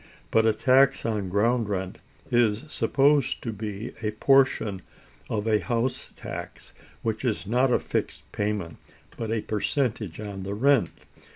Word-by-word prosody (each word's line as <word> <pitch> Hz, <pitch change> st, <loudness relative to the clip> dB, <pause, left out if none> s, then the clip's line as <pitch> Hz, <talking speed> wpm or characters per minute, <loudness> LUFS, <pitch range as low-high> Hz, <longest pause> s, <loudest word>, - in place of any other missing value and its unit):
But 110 Hz, 0 st, +4 dB
a 110 Hz, -, +4 dB
tax 135 Hz, +4 st, +3 dB
on 105 Hz, -4 st, -1 dB
ground 115 Hz, +3 st, +1 dB
rent 95 Hz, -2 st, -3 dB, 0.3 s
is 115 Hz, -1 st, +2 dB
supposed 140 Hz, -1 st, +2 dB
to 115 Hz, -, -3 dB
be 105 Hz, +1 st, -5 dB
a 110 Hz, -, 0 dB
portion 110 Hz, -4 st, +2 dB, 0.5 s
of 105 Hz, 0 st, -2 dB
a 110 Hz, -1 st, +3 dB
house 120 Hz, +7 st, -2 dB
tax -, -, -8 dB, 0.3 s
which 110 Hz, 0 st, -2 dB
is 115 Hz, -6 st, -1 dB
not 125 Hz, +5 st, +2 dB
a -, -, +5 dB
fixed -, -, -3 dB
payment, 100 Hz, -5 st, -2 dB, 0.4 s
but 115 Hz, -, -4 dB
a 115 Hz, -1 st, 0 dB
percentage 110 Hz, -, -2 dB
on 100 Hz, -2 st, -6 dB
the 100 Hz, +2 st, -4 dB
rent. 135 Hz, +3 st, +3 dB
110 Hz, 150 wpm, -26 LUFS, 105-125 Hz, 0.5 s, a